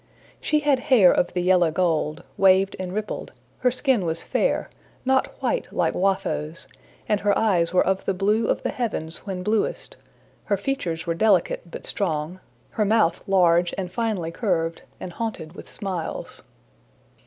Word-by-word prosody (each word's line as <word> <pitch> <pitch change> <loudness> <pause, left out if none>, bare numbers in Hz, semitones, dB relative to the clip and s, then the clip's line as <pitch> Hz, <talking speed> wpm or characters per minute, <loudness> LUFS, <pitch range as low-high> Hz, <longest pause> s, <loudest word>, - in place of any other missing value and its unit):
She 300 -1 +1
had 290 -3 +2
hair 220 -9 +7
of - - 0
the 180 - -1
yellow 180 -2 +4
gold, 160 -2 0
waved 190 0 +4
and 185 -1 -4
rippled; 210 +2 -4 0.3
her 250 - +3
skin 255 -3 +1
was 165 -1 -3
fair, - - 0 0.4
not 265 0 +1
white - - -1
like - - 0
Watho's, 185 -4 -1 0.4
and 210 - +2
her 205 0 +2
eyes 180 -7 +2
were 180 - +3
of 190 +1 0
the 195 - 0
blue 210 +4 +1
of - - 0
the - - -1
heavens 205 -9 -3
when 185 -2 -4
bluest; 220 - -1 0.5
her 200 - +1
features 185 -8 -3
were 170 - 0
delicate 180 -2 +1
but - - -8
strong, 165 -2 -2 0.3
her 215 - 0
mouth 215 -5 +2
large 175 -2 +3
and 185 -2 -4
finely 205 -6 -2
curved, 165 -4 -1 0.2
and 180 - -7
haunted 190 -7 -5
with - - -11
smiles. 185 -6 -5
190 Hz, 160 wpm, -24 LUFS, 170-215 Hz, 0.5 s, hair